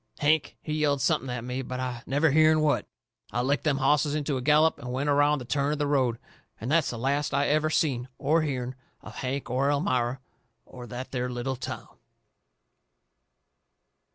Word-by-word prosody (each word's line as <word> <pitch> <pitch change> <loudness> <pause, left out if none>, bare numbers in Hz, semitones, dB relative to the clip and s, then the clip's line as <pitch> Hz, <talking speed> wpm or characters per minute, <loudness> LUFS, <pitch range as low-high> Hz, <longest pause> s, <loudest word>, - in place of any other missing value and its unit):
Hank, 155 +1 +1
he 155 - -3
yelled 150 -2 +1
something 140 -1 +1
at 125 -2 -4
me, 125 +2 -3
but 125 0 -5
I 125 -2 -3
never 145 +3 +2
hearn 155 +1 +5
what. 150 -1 +1 0.4
I 120 +3 0
licked 140 +2 0
them 145 -3 +2
hosses 145 +1 +2
into 145 -1 -1
a 130 - -2
gallop 155 +4 +4
and 125 +1 -6
went 140 +3 0
around 145 +1 +4
the 125 - -7
turn 140 +3 0
of - - -2
the 145 - 0
road. 130 -5 +1 0.4
And 120 +5 -4
that's 160 -2 +3
the 120 - -4
last 140 +3 0
I 140 +1 +2
ever 155 +1 +2
seen 130 -6 0
or 155 +4 +2
hearn 130 -4 -2 0.3
of - - -10
Hank 135 +1 -3
or 135 +3 +1
Elmira 130 -4 0 0.5
or 125 -1 -10
that 125 +3 -7
there 125 -1 -2
little 125 +2 -3
town. 130 - -6
140 Hz, 185 wpm, -27 LUFS, 125-150 Hz, 0.5 s, hearn